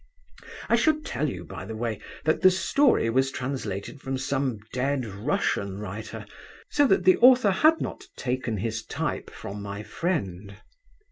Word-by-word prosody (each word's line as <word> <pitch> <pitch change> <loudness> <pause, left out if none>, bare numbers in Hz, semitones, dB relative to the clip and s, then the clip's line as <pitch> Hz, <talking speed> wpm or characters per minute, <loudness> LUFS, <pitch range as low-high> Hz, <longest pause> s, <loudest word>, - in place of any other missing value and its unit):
I 235 - +4
should 305 +4 +2
tell 145 +4 -1
you, - - -6
by - - -8
the 110 - -6
way, 110 -2 -3 0.2
that 155 - +2
the 185 - +8
story 190 - +3
was 130 +2 +2
translated 130 -2 -4
from 135 0 -3
some 135 -2 -1 0.2
dead 130 0 0
Russian 100 -2 -1
writer, 105 +2 -6 0.5
so 290 -1 +4
that 190 -5 +3
the 185 - +6
author 245 -4 +6
had 315 +12 +4
not - - -5
taken 125 -3 -2
his 110 +2 -3
type - - -3
from 100 +1 -8
my 100 +1 -6
friend. 100 - -3
130 Hz, 155 wpm, -26 LUFS, 105-175 Hz, 0.5 s, the